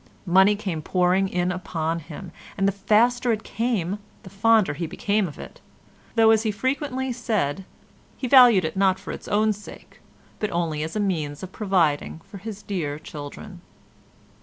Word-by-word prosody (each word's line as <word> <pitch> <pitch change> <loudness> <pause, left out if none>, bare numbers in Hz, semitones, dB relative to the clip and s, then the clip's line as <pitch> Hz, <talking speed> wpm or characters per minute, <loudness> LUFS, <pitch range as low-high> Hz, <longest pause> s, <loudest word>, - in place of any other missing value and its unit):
Money 190 +3 +5
came 190 -6 -4
pouring 180 +3 +2
in 180 0 0
upon 165 -2 -2
him, 165 +3 -9 0.3
and 195 0 +2
the - - +3
faster 235 +5 +2
it 220 -1 -1
came 210 -5 -2 0.2
the 190 - -12
fonder 215 -4 +3
he 165 +3 -4
became 205 +4 0
of 150 - -10
it, - - -11 0.5
though, 225 -1 +6
as 220 -1 +4
he 220 - -1
frequently 260 +3 -2
said, 195 - -1 0.5
he 255 - -3
valued 240 - +7
it 160 - -3
not 190 -1 +3
for 195 - -8
its - - -8
own 215 +1 +2
sake, 210 0 -13 0.4
but 210 - -1
only 165 -3 -1
as 160 +4 -4
a - - 0
means 155 -7 -2
of 185 - -7
providing 170 -8 0
for 200 - -11
his 210 0 -8
dear 155 -8 -3
children. 155 +5 -9
195 Hz, 170 wpm, -24 LUFS, 170-215 Hz, 0.5 s, valued